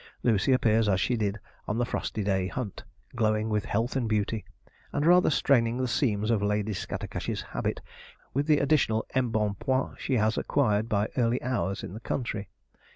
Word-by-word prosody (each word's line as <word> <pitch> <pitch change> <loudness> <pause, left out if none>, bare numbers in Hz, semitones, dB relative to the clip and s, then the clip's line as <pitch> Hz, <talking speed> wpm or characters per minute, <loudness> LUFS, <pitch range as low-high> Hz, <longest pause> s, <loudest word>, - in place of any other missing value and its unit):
Lucy 115 +1 +3
appears 115 -4 +3
as 95 -2 +2
she 125 - +1
did 105 -2 -1 0.3
on 105 - -1
the 120 - +1
frosty 110 -3 -3
day 95 -2 +1
hunt, 110 -1 -5 0.3
glowing 110 -1 +1
with 105 -1 0
health 115 +5 -1
and 120 -4 0
beauty, 105 0 0 0.5
and 145 +1 0
rather 180 +2 +6
straining 120 -5 +2
the 130 0 0
seams 115 -3 +1
of 110 -3 +2
Lady 105 +1 0
Scattercash's 95 - -4
habit - - -3 0.5
with 140 +3 0
the 150 -2 +5
additional 140 -6 +2
embonpoint 120 +1 0
she 135 - 0
has 110 0 +2
acquired 110 -6 +1
by 105 0 +1
early 120 0 +2
hours 120 -6 -1
in - - -6
the 110 - -7
country. 110 -5 -3
110 Hz, 170 wpm, -28 LUFS, 105-125 Hz, 0.5 s, rather